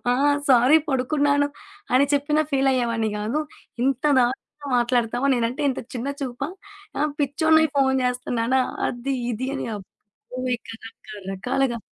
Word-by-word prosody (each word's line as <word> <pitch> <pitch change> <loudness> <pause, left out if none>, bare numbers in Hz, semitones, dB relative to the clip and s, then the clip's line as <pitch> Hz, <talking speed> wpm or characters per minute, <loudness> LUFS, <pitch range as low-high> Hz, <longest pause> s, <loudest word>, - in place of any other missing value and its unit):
ఆ! - - +2 0.3
సారీ 255 +4 +6
పడుకున్నాను 285 +2 +2 0.5
అని 280 +2 +5
చెప్పినా 300 +2 +2
ఫీలయ్యేవాడిని 245 -5 +1
గాదు. 220 +8 -1 0.4
ఇంత 270 +1 0
దారుణంగా 265 +3 -2
మాట్లాడతావా 245 +2 +1
నేనుంటే 245 +5 -1
ఇంత - - -4
చిన్న 245 +3 -3
చూపా? 270 +2 -3 0.5
ఆ! - - -1 0.2
పిచ్చోణ్ణయి 315 +2 +3
ఫోను 265 -1 +3
చేస్తున్నానా? 250 0 0 0.3
అది 250 +3 -3 0.2
ఇది" 260 +4 -3
అని - - -4
అబ్బో! 195 -2 -14 0.6
ఇక - - -22 0.2
రక - - -28 0.2
రకాలుగా. 240 +3 -1
260 Hz, 125 wpm, -23 LUFS, 240-280 Hz, 0.6 s, సారీ